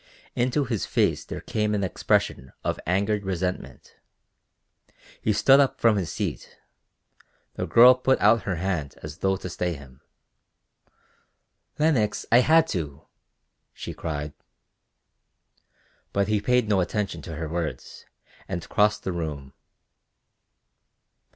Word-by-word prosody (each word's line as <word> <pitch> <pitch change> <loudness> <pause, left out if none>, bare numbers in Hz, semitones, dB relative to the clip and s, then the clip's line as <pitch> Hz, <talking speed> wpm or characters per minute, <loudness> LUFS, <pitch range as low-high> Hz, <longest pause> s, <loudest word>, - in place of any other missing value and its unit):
Into 130 +3 +1
his 115 -5 -2
face - - +1
there - - -7
came 105 -1 -1
an 100 - -1
expression 65 -7 -1
of - - -2
angered 100 +3 +1
resentment. 90 -1 -4 1.2
He 110 - +1
stood 135 +6 +5
up 140 -2 +2
from 115 -2 +4
his 95 -5 -2
seat; - - -5 1.0
the - - -4
girl 125 +2 +8
put 130 +1 +1
out 110 +2 +4
her 95 - -2
hand 85 -5 -3
as 75 +3 -8
though 95 0 +1
to 90 - -7
stay 90 0 -2
him: 65 -3 -14 1.8
"Lenox, 130 -10 +1
I 120 - +7
had 160 +5 +5
to," 75 -4 -4 0.7
she - - -7
cried. 75 -2 -5 1.8
But 100 0 +1
he 105 -1 +1
paid 125 0 +2
no 100 -3 +2
attention 100 +2 -2
to 80 - -7
her 80 +1 -4
words 85 0 -5 0.4
and 85 - -4
crossed 105 0 +2
the 95 - -2
room. 75 -6 -5
100 Hz, 125 wpm, -25 LUFS, 85-110 Hz, 1.8 s, girl